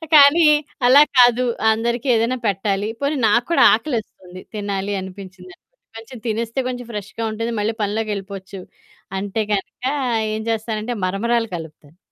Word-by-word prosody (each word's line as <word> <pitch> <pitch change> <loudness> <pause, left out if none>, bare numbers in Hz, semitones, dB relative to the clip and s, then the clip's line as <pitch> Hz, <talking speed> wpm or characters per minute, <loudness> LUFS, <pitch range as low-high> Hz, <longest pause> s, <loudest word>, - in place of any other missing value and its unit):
కానీ 300 +3 +7 0.4
అలా 270 +3 +8 0.2
కాదు. 245 0 +5 0.3
అందరికి 235 +3 -2
ఏదైనా 230 +3 +1
పెట్టాలి. 200 +1 -1
పోనీ 280 +1 0
నాకు 235 +3 +2
కూడా 335 - +5
ఆకలేస్తుంది. 215 -7 -4
తినాలి 200 -1 -3
అనిపించింది 185 -1 -10
అనుకోండి. - - -53
కొంచెం 230 +3 -10
తినేస్తే 230 +3 -2
కొంచెం 245 -1 -6
ఫ్రెష్‌గా 210 +2 -6
ఉంటుంది. 230 +2 -3
మళ్ళి 215 +2 -1
పనిలోకెళ్ళిపోవచ్చు. 200 -2 -4 0.6
అంటే 205 +2 -2
గనుక 200 +4 -4 0.5
ఏం 220 - -4
చేస్తానంటే 225 +1 -3
మరమరాలు 225 +5 0
కలుపుతాను. 160 -1 -12
220 Hz, 130 wpm, -20 LUFS, 195-235 Hz, 0.6 s, అలా